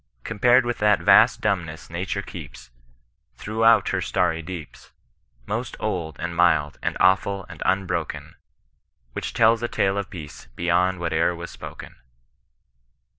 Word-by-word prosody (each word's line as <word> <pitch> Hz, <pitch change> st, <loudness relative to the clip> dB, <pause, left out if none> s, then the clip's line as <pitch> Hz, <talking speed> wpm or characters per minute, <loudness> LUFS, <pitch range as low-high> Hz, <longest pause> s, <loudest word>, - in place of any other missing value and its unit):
Compared 120 Hz, +3 st, +3 dB
with 120 Hz, 0 st, -3 dB
that 105 Hz, 0 st, +4 dB
vast 110 Hz, +4 st, +5 dB
dumbness 90 Hz, -7 st, -2 dB
Nature 95 Hz, +3 st, -3 dB
keeps 65 Hz, -9 st, -10 dB, 0.6 s
Throughout 110 Hz, -1 st, +3 dB
her -, -, 0 dB
stany 80 Hz, 0 st, 0 dB
deeps. 85 Hz, -3 st, -9 dB, 0.6 s
Most 115 Hz, -, -4 dB
old, 85 Hz, -7 st, -3 dB
and 85 Hz, -1 st, -4 dB
mild, 80 Hz, -4 st, +2 dB
and -, -, -2 dB
awful, 95 Hz, +1 st, +2 dB
and 80 Hz, -3 st, -12 dB
unbroken. 95 Hz, -4 st, -2 dB, 0.8 s
Which -, -, -4 dB
tdls 115 Hz, 0 st, +4 dB
a 120 Hz, -, -1 dB
tale 95 Hz, -3 st, 0 dB
of 100 Hz, -, -5 dB
Peace 75 Hz, -8 st, -10 dB
beyond 90 Hz, +2 st, +1 dB
whate'er 85 Hz, 0 st, 0 dB
was 85 Hz, 0 st, -8 dB
spoken. -, -, -10 dB
95 Hz, 130 wpm, -23 LUFS, 85-105 Hz, 0.8 s, vast